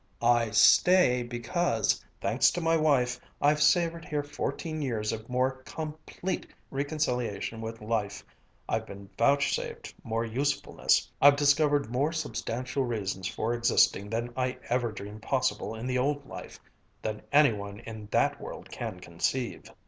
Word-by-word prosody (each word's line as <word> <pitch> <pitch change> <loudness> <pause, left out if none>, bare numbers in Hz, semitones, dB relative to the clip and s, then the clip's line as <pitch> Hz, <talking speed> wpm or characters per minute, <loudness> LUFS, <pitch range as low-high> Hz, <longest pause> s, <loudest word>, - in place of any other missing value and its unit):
"I 120 -1 +4
stay 125 - +5
because, 120 +2 0 0.2
thanks - - +3
to 175 - -2
my 165 -1 +2
wife, 140 -6 +2 0.2
I've 150 +1 +3
savored 165 +2 +3
here 150 -1 -2
fourteen 155 +2 -4
years 115 -6 -1
of 110 +1 -6
more 130 +1 0
complete 155 +5 -5 0.2
reconciliation 125 -7 -2
with 115 0 -6
life 105 -3 -2 0.4
I've - - -1
been 100 0 -11
vouchsafed 140 0 +1
more 115 +1 -1
usefulness 140 +5 +1
I've 145 0 +8
discovered 145 -2 +3
more 140 +5 +1
substantial 130 -4 -2
reasons 100 -6 -2
for 110 +5 -2
existing 115 -4 +3
than 115 +2 -3
I 130 0 -1
ever 120 -1 +1
dreamed 105 0 -8
possible 130 -2 -1
in 110 +2 -6
the 125 0 0
old 145 +2 0
life - - -9 0.4
than 105 -1 -3
any 145 -4 +6
one 100 0 -7
in 110 -2 -8
that - - +1
world - - -8
can 90 - -5
conceive!" 105 +9 -3
125 Hz, 140 wpm, -29 LUFS, 110-145 Hz, 0.4 s, I've